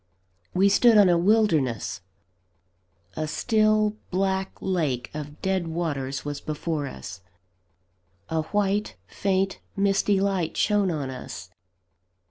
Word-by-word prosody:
We 190 +2 +5
stood 220 +3 +5
on 200 -3 +7
a 175 - +4
wilderness 170 - +1 1.1
a 155 0 -2
still, 215 +3 +2
black 190 0 0
lake 155 -10 -1
of 150 0 -7
dead 190 -3 0
waters 145 -6 -3
was 145 -1 -4
before 155 -1 -3
us; 95 - -8 1.1
a 160 0 0
white, 205 0 0
faint, 195 0 -1 0.2
misty 200 0 +2
light 190 -4 -1
shone 205 -2 +2
on 145 -6 -3
us. 95 -7 -8
185 Hz, 110 wpm, -25 LUFS, 150-200 Hz, 1.1 s, on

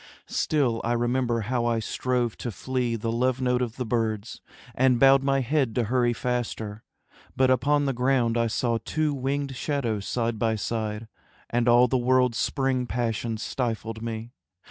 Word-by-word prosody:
Still 130 -7 0
I 120 - 0
remember 120 0 0
how 120 +2 -1
I 115 -1 +1
strove 120 +1 -1
to 120 - -4
flee 125 +2 -2
The 115 0 -2
love 125 +2 +1
note 125 -1 +1
of 120 -2 -2
the 125 - -3
birds, 110 -1 -2 0.3
and 125 -1 +3
bowed 135 +1 +6
my 135 0 +1
head 130 -3 0
To 120 - +2
hurry 120 +2 +2
faster, 115 -3 -3 0.5
but 130 0 +3
upon 145 +3 +2
the 135 - 0
ground 125 -2 +1
I 115 -1 +2
saw 115 +1 0
two 155 +4 0
winged 140 0 -2
shadows 120 -8 -2
side 115 -2 -1
by 115 0 +1
side, 110 0 -3 0.4
And 120 0 +1
all 120 +1 +6
the 130 +1 +1
world's 125 -1 +2
spring 135 -3 0
passion 115 -1 -2
stifled 115 -2 -3
me. 115 0 -5
120 Hz, 165 wpm, -26 LUFS, 115-130 Hz, 0.5 s, bowed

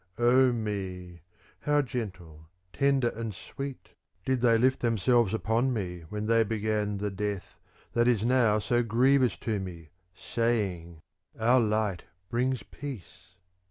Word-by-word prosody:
Oh 125 +2 +5
me! 95 -6 -4 0.4
how 145 0 +2
gentle, 90 - -6 0.3
tender 140 -3 +2
and 115 -3 -5
sweet 135 +7 -7 0.4
did 130 -2 0
they 115 -2 +5
lift 130 +3 +2
themselves 115 -1 +2
upon 115 +3 +1
me 90 -6 -4
when 105 +1 -4
they 115 +1 +4
began 105 -1 -1
the 105 +1 -2
death 100 0 -4 0.3
that 120 0 +3
is 115 -4 +2
now 120 -3 +3
so 120 +3 +1
grievous 125 +3 +3
to 110 -3 -1
me, 85 -5 -8 0.3
saying: 95 -9 -2 0.2
' - - -28
Our 120 +3 +4
light 105 -4 0 0.3
brings 125 +2 0
peace.' 100 -8 -10
110 Hz, 135 wpm, -28 LUFS, 100-125 Hz, 0.4 s, Oh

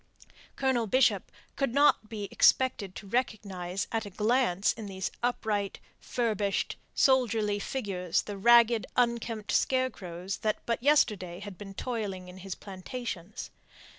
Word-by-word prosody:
Colonel 260 -4 +1
Bishop 260 +6 +3 0.2
could 275 -3 -1
not 280 -6 +4
be 210 -3 -4
expected 210 -8 +3
to - - -8
recognize 195 -5 -2
at 225 -1 0
a 205 - -7
glance 210 -2 +2
in 220 -3 -8
these 190 -2 -4
upright, 215 -5 -1 0.2
furbished, 210 -5 -1 0.2
soldierly 225 -6 +3
figures 195 -8 -1
the 205 - -6
ragged, 235 +2 +5
unkempt 235 -3 0
scarecrows 195 -8 -1
that 215 -1 0
but 235 0 -1
yesterday 210 -11 +2
had 205 -1 -8
been 195 +1 -10
toiling 200 -6 -4
in 180 - -11
his 190 -1 -6
plantations. 200 -1 -6
210 Hz, 130 wpm, -29 LUFS, 195-240 Hz, 0.2 s, ragged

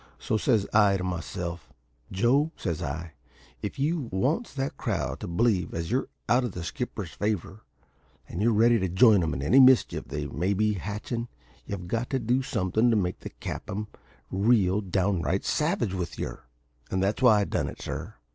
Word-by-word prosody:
So - - -2
says 110 -2 +2
I 105 -2 +5
to 90 - -4
myself, 90 -2 -4 0.4
`Joe,' 125 +10 +3
says 85 -6 -3
I, 80 +4 -4 0.5
`if - - -4
you 145 -2 -1
wants 135 - 0
that 135 0 -2
crowd - - -2
to - - -5
believe 90 0 +1
as 85 +3 -3
you're 130 +2 +1 0.2
out 125 +2 +3
of 120 -6 -3
the 90 - -5
skipper's 100 -2 -4
favour, 105 +2 -3 0.7
and 85 - -5
are 115 - +4
ready 115 +2 +4
to 95 -1 -1
join 105 +2 +6
'em 80 -4 -1
in 65 - -3
any 125 - +5
mischief 130 -1 +5
they 75 +2 -4
may 90 +7 -1
be 105 +2 +2
hatchin', 105 +5 -4 0.4
you've 90 -3 -5
got 115 +6 -2
to 135 - 0
do 125 +2 +1
somethin' 115 -3 +1
to 115 - +3
make 90 -4 0
the - - -7
cap'n 105 +2 -5 0.5
real 100 -1 +3
downright 95 -1 0
savage 150 - 0
with 90 -2 -4
yer.' - - -5 0.4
And 95 0 0
that's 100 +6 0
why 110 -5 +6
I - - +2
done - - -1
it, - - -10
sir. - - -6
100 Hz, 185 wpm, -27 LUFS, 90-120 Hz, 0.7 s, join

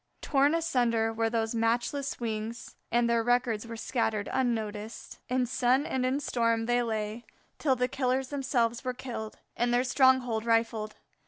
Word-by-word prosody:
Torn 285 +2 +3
asunder 240 -9 +1
were 225 0 0
those 225 0 -1
matchless 240 +5 0
wings, 225 0 -4 0.2
and 235 0 +3
their 235 0 +2
records 240 -2 +1
were 230 0 -6
scattered 225 -3 -1
unnoticed. 220 -3 -3
In 250 0 +1
sun 255 +3 +2
and 260 -1 -1
in 265 +2 0
storm 230 -4 0
they 240 +1 +2
lay 220 0 -3 0.4
till 270 -4 +2
the 250 0 +1
killers 260 0 -1
themselves 250 -5 0
were 255 -1 -2
killed 235 -4 -6 0.2
and 240 +1 +1
their 245 +1 +3
stronghold 255 -4 +3
rifled. 225 -2 0
240 Hz, 155 wpm, -29 LUFS, 225-255 Hz, 0.4 s, Torn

